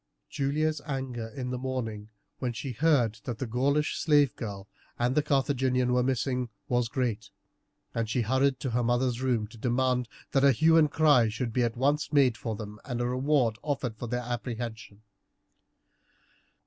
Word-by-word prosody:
Julia's 150 +2 0
anger 130 -5 -3
in 125 +3 -5
the 125 - -3
morning, 115 -5 -4 0.3
when 125 -2 -2
she 120 +4 -5
heard 125 -5 +2
that 120 -3 -4
the 130 - -3
Gaulish 140 +6 0
slave 145 -3 +3
girl 100 -4 -6 0.3
and 120 +1 +1
the 150 - +3
Carthaginian 130 -3 +1
were 125 - +3
missing, 125 -1 -1 0.2
was 120 -1 +1
great, 115 -4 -2 0.6
and 115 -2 -2
she 120 - +1
hurried 130 +3 +2
to 130 - -2
her 120 +2 +1
mother's 120 +1 +1
room 125 -5 +1
to 115 - -14
demand 125 0 +1 0.2
that 135 - +2
a 140 -1 +6
hue 160 +7 +4
and 155 -2 +5
cry 145 -7 +4
should 115 +1 -3
be 125 - +1
at 120 -1 0
once 145 +3 +1
made 135 -5 +4
for 110 0 -4
them, 105 0 -8
and 125 -3 -4
a 120 - 0
reward 125 -3 +1
offered 135 -6 -2
for 120 +2 -6
their 125 +1 -2
apprehension. 115 -3 -5
125 Hz, 175 wpm, -28 LUFS, 115-135 Hz, 0.6 s, a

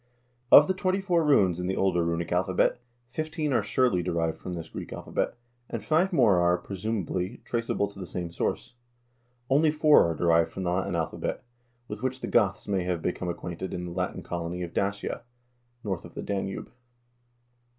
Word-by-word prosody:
Of - - +10
the 190 - +2
twenty 185 0 0
four 180 -4 +2
runes 95 - +4
in 90 - -2
the 95 - 0
older 90 -3 +2
runic 85 0 -2
alphabet, 90 +5 +2 0.3
fifteen 155 0 -2
are 120 - +3
surely 125 -9 +2
derived 85 -2 -1
from 90 - -6
this 85 -2 -5
Greek - - -8
alphabet, - - -2 0.3
and 115 -3 -4
five 170 - +3
more 115 - +4
are, 85 0 +3
presumably, 95 +1 -3
traceable 115 -3 -1
to 100 - -13
the 95 - -6
same 85 -1 -4
source. 100 - -2 0.7
Only 145 +4 +4
four 150 - +5
are 85 - -2
derived 85 0 +3
from 95 - -5
the 90 - 0
Latin 95 0 -1
alphabet, 80 -2 -2 0.4
with 105 0 -6
which 130 0 -2
the - - -3
Goths 100 -5 +2
may 95 -3 0
have 90 -2 -2
become 90 0 -2
acquainted 85 +1 -5
in 90 - -4
the 85 - -6
Latin 90 +1 -3
colony 85 +1 -4
of 85 - -6
Dacia, 100 +4 -2 0.6
north 95 -5 -3
of 85 - -13
the - - -5
Danube. 95 -1 -3
95 Hz, 180 wpm, -27 LUFS, 85-120 Hz, 0.7 s, Of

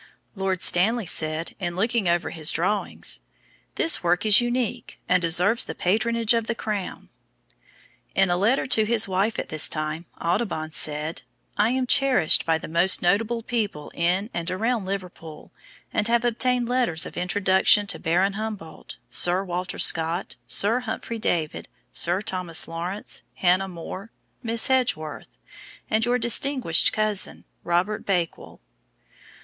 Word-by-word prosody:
Lord 190 -2 -2
Stanley 215 +5 +4
said 155 -1 -3
in 175 -2 -3
looking 220 +1 0
over 175 0 0
his 160 -1 0
drawings: 190 +6 -2 0.6
"This 330 - +2
work 175 +3 +1
is 215 +2 +7
unique, 240 -1 -3
and 180 0 +3
deserves 180 +7 +2
the - - -6
patronage 225 +4 +1
of 230 -1 0
the 235 - -1
Crown." 210 -4 -5 1.1
In 190 -2 +3
a - - +2
letter 215 +9 +1
to 225 -4 +3
his 225 0 +1
wife 195 +4 0
at - - -4
this 155 -1 +5
time, 155 +2 -4
Audubon 170 -3 -2
said: 150 +2 -1 0.3
"I 210 +2 +2
am 255 +1 0
cherished 255 - +3
by 165 -1 +3
the - - -8
most 170 +3 +2
notable 225 +6 +1
people 210 -11 -3
in 185 +6 0
and 170 0 -3
around 220 +3 -1
Liverpool, 180 -5 -7 0.4
and 210 - 0
have 235 +1 +2
obtained 245 +1 0
letters 245 -10 +1
of - - -9
introduction 190 +2 +2
to - - -5
Baron 185 +4 +1
Humboldt, 210 -6 -7
Sir 180 +2 +3
Walter 180 -1 -4
Scott, 165 +3 +2
Sir 225 +5 +3
Humphry 230 -1 -5
Davy, 165 -7 -1 0.3
Sir 180 +4 0
Thomas 180 -6 -1
Lawrence, 175 +5 -5
Hannah 185 +1 +2
More, 185 +4 -8 0.3
Miss 230 -2 +1
Edgeworth, 155 - -1 0.5
and 220 +1 +2
your 245 +1 +2
distinguished 240 - +2
cousin, 215 -2 -1 0.2
Robert 185 +6 0
Bakewell." 175 -4 -3
195 Hz, 145 wpm, -24 LUFS, 175-230 Hz, 1.1 s, is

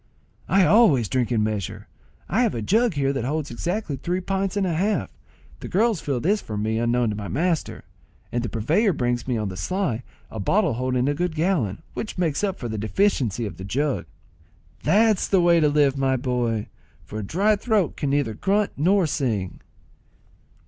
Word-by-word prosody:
"I 195 -1 +5
always 160 - +5
drink 125 +1 0
in 110 -3 +2
measure. 105 -4 -3 0.4
I 220 - +1
have 235 -4 +1
a 115 - -3
jug 225 - +2
here 140 -1 +1
that 135 - -2
holds 145 +2 -2
exactly 170 - -3
three 175 +7 -2
pints 195 +1 -2
and 200 - +1
a 175 - 0
half. 200 +6 0 0.5
The - - -7
girls 215 -1 +1
fill 135 -4 -1
this 205 - +1
for 105 - -6
me 110 +2 -1
unknown 120 -1 +1
to - - -3
my 100 -1 -5
master, 165 +2 -1 0.5
and 120 - -1
the 120 - -3
purveyor 160 - +1
brings 120 -4 -1
me 125 -3 0
on 105 -2 -2
the 95 - -7
sly 180 - -1 0.3
a 110 - -6
bottle 175 - +2
holding 125 +1 0
a 145 - +2
good 175 +2 -2
gallon, 155 - 0
which 215 - -5
makes 170 -1 0
up 195 -2 0
for 120 - -5
the 110 -2 -4
deficiency 115 - 0
of 105 - -6
the 95 - -8
jug." 135 +8 -1 0.7
"That's 210 +4 +3
the 195 - +3
way 170 -1 +5
to 150 -2 +4
live, 145 -2 +3
my 135 -1 +2
boy, 120 -4 -1 0.3
for 110 - -7
a - - -4
dry 200 - +2
throat 210 -4 0
can 145 - -2
neither 140 -5 +1
grunt 200 - +1
nor 185 +5 +3
sing." 110 - -2
145 Hz, 195 wpm, -24 LUFS, 120-190 Hz, 0.7 s, I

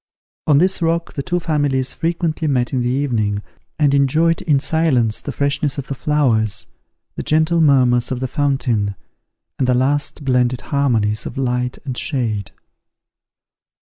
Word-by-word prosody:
On 145 - +5
this 185 +4 +2
rock 165 0 0
the 140 - -3
two 175 +4 -1
families 145 -5 0
frequently 165 -1 -1
met 125 -3 0
in 130 - +1
the 120 - 0
evening, 115 -7 -1 0.3
and 145 -2 +3
enjoyed 155 +4 +2
in 150 -5 +2
silence 135 -8 +1
the 145 - -5
freshness 140 0 -1
of 140 - -5
the - - -1
flowers, 120 -8 +1 0.5
the - - -4
gentle 160 +2 +2
murmurs 125 -5 +3
of 130 - -2
the 130 - -2
fountain, 125 -8 0 0.6
and 130 - +1
the 125 - +3
last 140 +3 0
blended 125 -1 +1
harmonies 115 -7 0
of - - -8
light 125 -1 -1
and 130 -3 -4
shade. 115 -8 -2
135 Hz, 150 wpm, -19 LUFS, 125-150 Hz, 0.6 s, On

